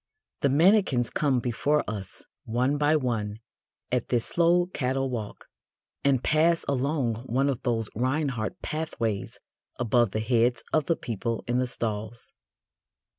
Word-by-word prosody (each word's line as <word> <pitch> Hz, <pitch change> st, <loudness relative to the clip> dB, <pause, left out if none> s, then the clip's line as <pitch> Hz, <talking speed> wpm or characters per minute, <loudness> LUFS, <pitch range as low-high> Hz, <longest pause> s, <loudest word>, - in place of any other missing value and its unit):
The 140 Hz, -, +2 dB
mannequins 155 Hz, -, +3 dB
come 140 Hz, -4 st, +1 dB
before 140 Hz, +5 st, 0 dB
us 100 Hz, -3 st, -7 dB, 0.2 s
one 125 Hz, +5 st, 0 dB
by 150 Hz, +1 st, +3 dB
one 115 Hz, -7 st, -1 dB, 0.5 s
at 125 Hz, -2 st, 0 dB
this 120 Hz, -2 st, +1 dB
slow 175 Hz, +1 st, +3 dB
cattle 135 Hz, -6 st, -1 dB
walk, 110 Hz, -4 st, -5 dB, 0.6 s
and 135 Hz, -3 st, +2 dB
pass 165 Hz, +2 st, +3 dB
along 135 Hz, -3 st, 0 dB
one 135 Hz, +4 st, +1 dB
of 130 Hz, -4 st, -2 dB
those 115 Hz, -4 st, 0 dB
Reinhardt 130 Hz, -, -1 dB
pathways 115 Hz, -10 st, -3 dB, 0.4 s
above 120 Hz, -1 st, +2 dB
the 110 Hz, -, -2 dB
heads 115 Hz, +1 st, +2 dB
of 155 Hz, -3 st, +2 dB
the 165 Hz, -, +3 dB
people 115 Hz, -2 st, -3 dB
in 120 Hz, +1 st, +1 dB
the 130 Hz, -, 0 dB
stalls. 110 Hz, -1 st, -4 dB
125 Hz, 135 wpm, -27 LUFS, 115-145 Hz, 0.6 s, mannequins